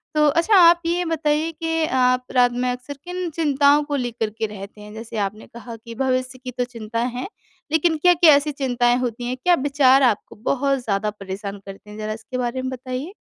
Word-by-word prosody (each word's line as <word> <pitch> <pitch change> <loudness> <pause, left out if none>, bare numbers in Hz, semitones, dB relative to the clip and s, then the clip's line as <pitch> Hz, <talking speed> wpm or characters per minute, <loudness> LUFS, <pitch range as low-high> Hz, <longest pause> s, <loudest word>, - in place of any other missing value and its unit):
तो 300 0 +4
अच्छा 335 +8 +3
आप 340 -1 +7
ये 350 +1 0
बताइए 315 0 0
कि 325 0 -1
आप 255 -2 +1
रात 245 -1 +5
में 250 +1 -1
अक्सर 255 +3 -7
किन 360 -1 -4
चिंताओं 290 -2 +3
को 290 -1 -3
लेकर 240 -4 -2
के 220 - -1
रहते 205 0 -10
हैं 210 0 -11
जैसे 225 0 -8
आपने 210 +2 -8
कहा 235 0 -10
कि 230 +1 -11
भविष्य 255 0 -1
की 250 - -5
तो 250 0 -2
चिंता 230 -2 -6 0.2
हैं 255 - -4 0.4
लेकिन 320 0 +2
क्या-क्या 340 -1 +6
ऐसी 290 +1 0
चिंताएँ 245 -3 +1
होती 240 -1 -3
हैं 255 - -2
क्या 355 -1 +5
विचार 275 -1 +4
आपको 225 -5 0
बहुत 275 +4 0
ज़्यादा 210 -1 -1
परेशान 200 0 -7
करते 195 +1 -11
हैं? 210 - -10
ज़रा 215 0 -3
इसके 225 +3 -7
बारे 250 +1 -2
में 260 - -3
बताइए। 260 +7 -6
255 Hz, 205 wpm, -22 LUFS, 230-300 Hz, 0.4 s, आप